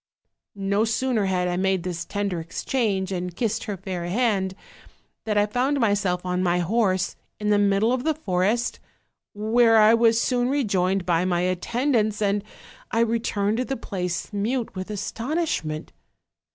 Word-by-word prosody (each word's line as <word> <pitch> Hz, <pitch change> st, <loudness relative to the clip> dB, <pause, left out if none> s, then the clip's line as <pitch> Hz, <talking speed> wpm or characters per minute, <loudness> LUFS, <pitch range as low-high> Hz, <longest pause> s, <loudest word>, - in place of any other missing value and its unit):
"No 200 Hz, +1 st, +1 dB
sooner 225 Hz, -1 st, 0 dB
had 180 Hz, -1 st, 0 dB
I 175 Hz, 0 st, -1 dB
made 190 Hz, -1 st, +1 dB
this 170 Hz, -1 st, -4 dB
tender 200 Hz, -4 st, -2 dB
exchange 195 Hz, +3 st, -1 dB
and 180 Hz, -1 st, -3 dB
kissed 225 Hz, +2 st, -1 dB
her 205 Hz, -3 st, -4 dB
fair 185 Hz, -2 st, -5 dB
hand, 195 Hz, -1 st, 0 dB, 0.7 s
than 210 Hz, -2 st, 0 dB
I 205 Hz, -, +4 dB
found 255 Hz, +6 st, 0 dB
myself 200 Hz, -5 st, +1 dB
on 180 Hz, 0 st, 0 dB
my 175 Hz, -1 st, +2 dB
horse, 185 Hz, 0 st, +1 dB, 0.2 s
in 210 Hz, 0 st, 0 dB
the 205 Hz, -, +4 dB
middle 205 Hz, +3 st, +3 dB
of 255 Hz, -1 st, -1 dB
the 315 Hz, 0 st, +1 dB
forest, 210 Hz, -, 0 dB, 0.6 s
where 225 Hz, +2 st, +4 dB
I 215 Hz, +1 st, +7 dB
was 230 Hz, 0 st, +4 dB
soon 245 Hz, 0 st, +1 dB
rejoined 195 Hz, -9 st, +1 dB
by 170 Hz, -1 st, +2 dB
my 175 Hz, -1 st, +1 dB
attendants, 215 Hz, +4 st, 0 dB
and 205 Hz, -1 st, +1 dB, 0.5 s
I 230 Hz, -, +1 dB
returned 220 Hz, -2 st, 0 dB
to 255 Hz, -, 0 dB
the 270 Hz, -, -3 dB
place 180 Hz, -2 st, -4 dB
mute 230 Hz, +4 st, -1 dB
with 185 Hz, +1 st, -6 dB
astonishment. 215 Hz, -, -3 dB
205 Hz, 155 wpm, -24 LUFS, 185-230 Hz, 0.7 s, I